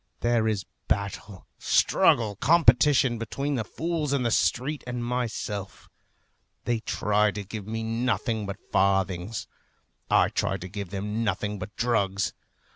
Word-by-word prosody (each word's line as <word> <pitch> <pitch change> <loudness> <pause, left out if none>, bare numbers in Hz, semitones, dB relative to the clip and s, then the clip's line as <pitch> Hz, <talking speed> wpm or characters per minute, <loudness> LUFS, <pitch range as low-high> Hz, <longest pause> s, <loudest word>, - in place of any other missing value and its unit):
There 120 -2 +2
is 105 -3 -1 0.2
battle, 100 -1 -3
struggle, 110 -3 +3
competition 135 -5 +4
between 140 +6 -3
the 120 -5 0
fools 160 +3 -2
in 135 -3 +1
the 120 - +1
street 130 +10 +1
and 120 -1 -3
myself. 110 -5 -4 0.7
They 120 -2 +1
try 105 -1 +1
to 105 0 -5
give 100 0 -7
me 110 +1 -3
nothing 115 -1 -1
but 100 0 -5
farthings. 95 +1 +1 0.6
I - - +4
try 95 - -1
to 90 -1 -7
give 100 0 -6
them 105 +3 -3
nothing 105 0 -2
but 95 0 -8
drugs. 100 -5 0
110 Hz, 135 wpm, -26 LUFS, 100-120 Hz, 0.7 s, competition